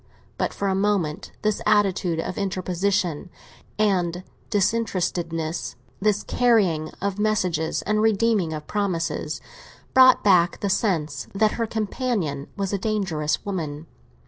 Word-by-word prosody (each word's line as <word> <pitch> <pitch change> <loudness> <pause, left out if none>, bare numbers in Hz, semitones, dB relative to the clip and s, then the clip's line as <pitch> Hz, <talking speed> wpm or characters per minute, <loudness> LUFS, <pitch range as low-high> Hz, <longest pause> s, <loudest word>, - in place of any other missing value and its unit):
But - - -1
for 200 - -3
a 190 - +2
moment 195 -4 0
this 215 -1 0
attitude 195 -5 +2
of 170 - -3
interposition 185 -3 -1 0.5
and 185 -4 +1 0.3
disinterestedness, 175 -6 -1 0.2
this 210 0 +1
carrying 195 -11 +2
of 200 0 -2
messages 185 -7 0
and 215 0 +1
redeeming 220 -5 +2
of 155 -1 -5
promises, 185 -5 -2 0.5
brought 260 -1 +7
back 180 -3 +4
the 200 - 0
sense 160 - -1
that 215 +1 +3
her 230 -1 -2
companion 210 - -2
was 195 0 -2
a 200 - 0
dangerous 185 -8 -1
woman. 160 -6 -4
195 Hz, 120 wpm, -24 LUFS, 165-210 Hz, 0.5 s, brought